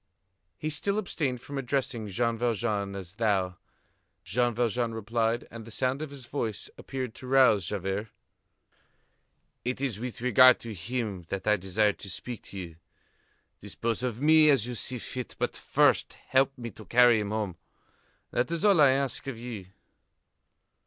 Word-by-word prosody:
He 155 Hz, -, -3 dB
still 200 Hz, +7 st, 0 dB
abstained 145 Hz, -, -2 dB
from 140 Hz, +2 st, -5 dB
addressing 125 Hz, -4 st, -2 dB
Jean 115 Hz, +4 st, 0 dB
Valjean 110 Hz, -4 st, -1 dB
as 95 Hz, -2 st, -7 dB
thou. 100 Hz, -4 st, 0 dB, 0.7 s
Jean 120 Hz, +6 st, +1 dB
Valjean 120 Hz, 0 st, 0 dB
replied, 115 Hz, +1 st, -1 dB
and 115 Hz, -1 st, -8 dB
the 115 Hz, -, -11 dB
sound 130 Hz, +5 st, -1 dB
of 155 Hz, -, -4 dB
his 140 Hz, -3 st, -9 dB
voice 115 Hz, -5 st, -4 dB
appeared 130 Hz, -4 st, -5 dB
to 130 Hz, -, -10 dB
rouse 125 Hz, -9 st, +5 dB
Javert: 100 Hz, +2 st, -2 dB, 1.6 s
"It 125 Hz, +1 st, -2 dB
is 130 Hz, -7 st, -2 dB
with 125 Hz, 0 st, -5 dB
regard 125 Hz, +1 st, +7 dB
to 115 Hz, -2 st, -6 dB
him 105 Hz, 0 st, -3 dB
that 100 Hz, -1 st, -4 dB
I 105 Hz, 0 st, +4 dB
desire 100 Hz, +2 st, +1 dB
to 100 Hz, -, -10 dB
speak 120 Hz, +5 st, -5 dB
to 100 Hz, -, -9 dB
you. 85 Hz, -4 st, -7 dB, 0.8 s
Dispose 115 Hz, +3 st, -3 dB
of 125 Hz, -3 st, -2 dB
me 155 Hz, +1 st, +6 dB
as 135 Hz, -6 st, +4 dB
you 125 Hz, -, -4 dB
see 125 Hz, +2 st, -2 dB
fit; 125 Hz, +1 st, -6 dB
but -, -, -1 dB
first -, -, +2 dB
help 135 Hz, +1 st, +1 dB
me 120 Hz, -2 st, -6 dB
to 110 Hz, +2 st, -13 dB
carry 120 Hz, -2 st, +5 dB
him 105 Hz, -1 st, -3 dB
home. 105 Hz, -5 st, -2 dB, 0.7 s
That 120 Hz, +1 st, 0 dB
is 170 Hz, +3 st, -1 dB
all 200 Hz, -3 st, +6 dB
that 150 Hz, -2 st, +7 dB
I 130 Hz, -, +5 dB
ask 135 Hz, -1 st, -1 dB
of 135 Hz, -4 st, -4 dB
you." 115 Hz, -5 st, -7 dB
120 Hz, 165 wpm, -28 LUFS, 105-130 Hz, 1.6 s, regard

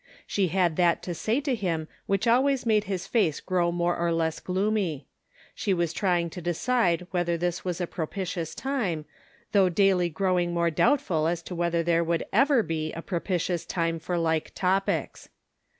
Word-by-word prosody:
She 195 Hz, -2 st, 0 dB
had 175 Hz, -2 st, +1 dB
that 175 Hz, -2 st, +3 dB
to 175 Hz, -, -3 dB
say 220 Hz, -, 0 dB
to 280 Hz, -2 st, -1 dB
him 170 Hz, -8 st, -2 dB, 0.2 s
which 195 Hz, +2 st, +1 dB
always 260 Hz, +3 st, +3 dB
made 215 Hz, -2 st, +3 dB
his 190 Hz, -3 st, -3 dB
face 195 Hz, -11 st, +1 dB
grow 175 Hz, -2 st, 0 dB
more 175 Hz, 0 st, 0 dB
or 170 Hz, 0 st, 0 dB
less 165 Hz, -1 st, 0 dB
gloomy: 190 Hz, -5 st, -1 dB, 0.5 s
she 195 Hz, -3 st, 0 dB
was 170 Hz, -2 st, 0 dB
trying 175 Hz, -3 st, 0 dB
to 180 Hz, -, -7 dB
decide 175 Hz, +1 st, +1 dB
whether 175 Hz, -2 st, 0 dB
this 175 Hz, +1 st, -2 dB
was 180 Hz, -1 st, -3 dB
a 180 Hz, -, 0 dB
propitious 175 Hz, 0 st, -4 dB
time, 210 Hz, -, -2 dB, 0.5 s
though 195 Hz, -3 st, +4 dB
daily 180 Hz, -1 st, +3 dB
growing 175 Hz, 0 st, 0 dB
more 170 Hz, 0 st, +2 dB
doubtful 165 Hz, -, +2 dB
as 170 Hz, 0 st, -1 dB
to 180 Hz, -, -7 dB
whether 170 Hz, -1 st, 0 dB
there 170 Hz, 0 st, +2 dB
would 170 Hz, 0 st, -1 dB
ever 270 Hz, +2 st, +4 dB
be 155 Hz, -3 st, -3 dB
a 165 Hz, -, -6 dB
propitious 175 Hz, -1 st, -1 dB
time 165 Hz, -1 st, -1 dB
for 175 Hz, +2 st, -2 dB
like 160 Hz, -2 st, 0 dB
topics. 190 Hz, +1 st, -1 dB
175 Hz, 175 wpm, -27 LUFS, 170-195 Hz, 0.5 s, though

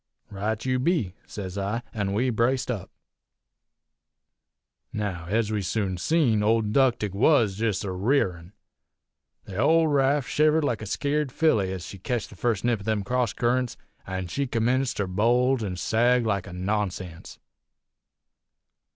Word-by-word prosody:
"'Right 105 Hz, +3 st, -3 dB
you 130 Hz, -1 st, +1 dB
be!' 135 Hz, -, 0 dB
sez 100 Hz, -1 st, -6 dB
I. 105 Hz, +5 st, -2 dB
An' 100 Hz, -3 st, -2 dB
we 125 Hz, +5 st, +1 dB
braced 125 Hz, +3 st, +1 dB
up. 105 Hz, -7 st, -5 dB, 2.0 s
"Now, 100 Hz, -6 st, -3 dB
ez 110 Hz, +2 st, 0 dB
we 105 Hz, -1 st, 0 dB
soon 95 Hz, -1 st, -1 dB
seen, 130 Hz, -, +2 dB
old 110 Hz, 0 st, +2 dB
'Ductic 120 Hz, -7 st, +2 dB
was 110 Hz, -2 st, +3 dB
jest 110 Hz, -3 st, 0 dB
a 100 Hz, -, -3 dB
rearin'. 95 Hz, -4 st, 0 dB, 0.9 s
The 95 Hz, -2 st, -8 dB
big 160 Hz, +7 st, +4 dB
raft 140 Hz, -1 st, +2 dB
shivered 155 Hz, +1 st, +3 dB
like 120 Hz, -6 st, -1 dB
a 110 Hz, -, -6 dB
skeered 145 Hz, +4 st, -1 dB
filly 110 Hz, -11 st, +2 dB
ez 95 Hz, -2 st, -5 dB
she 100 Hz, -, -9 dB
ketched 120 Hz, +3 st, -3 dB
the -, -, -11 dB
first 115 Hz, 0 st, -1 dB
nip 120 Hz, -3 st, +2 dB
of 100 Hz, -, -11 dB
them 110 Hz, -2 st, 0 dB
cross 125 Hz, +1 st, 0 dB
currents, 125 Hz, 0 st, 0 dB, 0.3 s
an' 95 Hz, 0 st, -3 dB
she 140 Hz, +11 st, -2 dB
commenced 125 Hz, +3 st, 0 dB
ter 100 Hz, -, 0 dB
bulge 120 Hz, +6 st, +2 dB
an' 95 Hz, -3 st, -3 dB
sag 120 Hz, +5 st, +2 dB
like 100 Hz, -4 st, -1 dB
a 90 Hz, -, -9 dB
nonsense. 95 Hz, -2 st, -3 dB
110 Hz, 150 wpm, -26 LUFS, 100-125 Hz, 2.0 s, big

